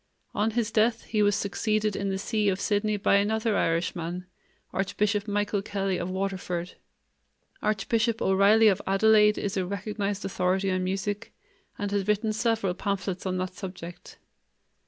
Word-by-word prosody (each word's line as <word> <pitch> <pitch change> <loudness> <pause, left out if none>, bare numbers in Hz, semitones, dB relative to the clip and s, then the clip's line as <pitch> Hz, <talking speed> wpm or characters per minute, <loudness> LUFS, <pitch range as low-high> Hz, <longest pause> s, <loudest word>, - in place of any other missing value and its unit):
On 210 +2 +1
his 230 0 -1
death 225 +1 +2
he 215 -1 -1
was 205 -1 +4
succeeded 215 +1 0
in 200 -1 -2
the 190 - -1
see 210 +1 0
of 190 0 -1
Sydney 210 0 0
by 200 0 +3
another 220 +2 +1
Irishman, 170 +1 -1 0.5
Archbishop 200 +2 0
Michael 205 0 0
Kelly 195 -2 -2
of 175 - -3
Waterford. 185 -2 -3 0.9
Archbishop 220 +2 0
O'Reily 200 +4 +5
of 195 -3 +3
Adelaide 210 +2 +5
is 200 -1 -2
a 190 - +1
recognized 200 +1 -3
authority 190 +1 0
on 185 0 0
music, 195 +3 -3 0.5
and 205 -1 -3
has 200 -1 -1
written 215 +1 +1
several 220 -4 0
pamphlets 195 -1 -3
on 185 0 -1
that 185 0 -3
subject. 180 -3 -9
200 Hz, 150 wpm, -27 LUFS, 190-215 Hz, 0.9 s, O'Reily